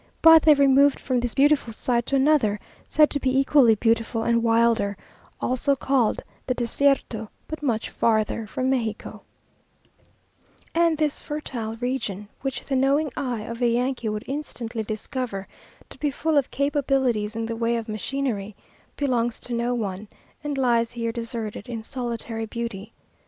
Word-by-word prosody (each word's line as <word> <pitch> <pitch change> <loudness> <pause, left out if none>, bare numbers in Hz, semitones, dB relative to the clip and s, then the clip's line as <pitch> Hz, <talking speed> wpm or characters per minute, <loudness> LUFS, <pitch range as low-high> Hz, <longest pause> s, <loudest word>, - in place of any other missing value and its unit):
But 325 0 +9
they 305 -1 +6
removed 280 0 +4
from 255 -2 0
this 240 -1 -3
beautiful 280 -3 +3
site 235 +1 -1
to 275 - +1
another, 265 -7 +3 0.3
said 300 -1 +4
to 285 - +1
be 260 -1 +1
equally 270 -4 +5
beautiful 225 +1 +1
and 235 0 +2
wilder, 230 -3 +2 0.4
also 255 +3 +1
called 260 -4 +1 0.2
the 255 - 0
Desierto, 240 -3 0 0.2
but 315 - -6
much 235 -6 -1
farther 220 -1 +1
from 260 +5 -1
Mexico; 225 -5 -3 1.5
and 335 -1 +3
this 300 -2 0
fertile 245 -7 -5
region 225 -5 -3
(which 270 -2 -4
the 275 - -1
knowing 275 +3 +2
eye 245 -5 -2
of 230 +2 -7
a 240 - +4
Yankee 240 0 0
would 210 0 -4
instantly 250 -5 -4
discover 215 -1 -4 0.4
to - - -11
be 295 - +1
full 310 +3 -1
of 280 -3 +2
capabilities 265 -6 0
in 225 0 -2
the 230 0 -3
way 230 +1 0
of 230 -1 -5
machinery), 215 -2 -3 0.4
belongs 240 -4 0
to 245 - -6
no 240 +1 0
one, 205 -2 -4 0.4
and 290 -2 -3
lies 235 -3 +2
here 230 -1 -2
deserted, 230 -2 -5
in 230 -2 -5
solitary 230 -2 -4
beauty. 230 -2 -5
240 Hz, 155 wpm, -24 LUFS, 225-275 Hz, 1.5 s, But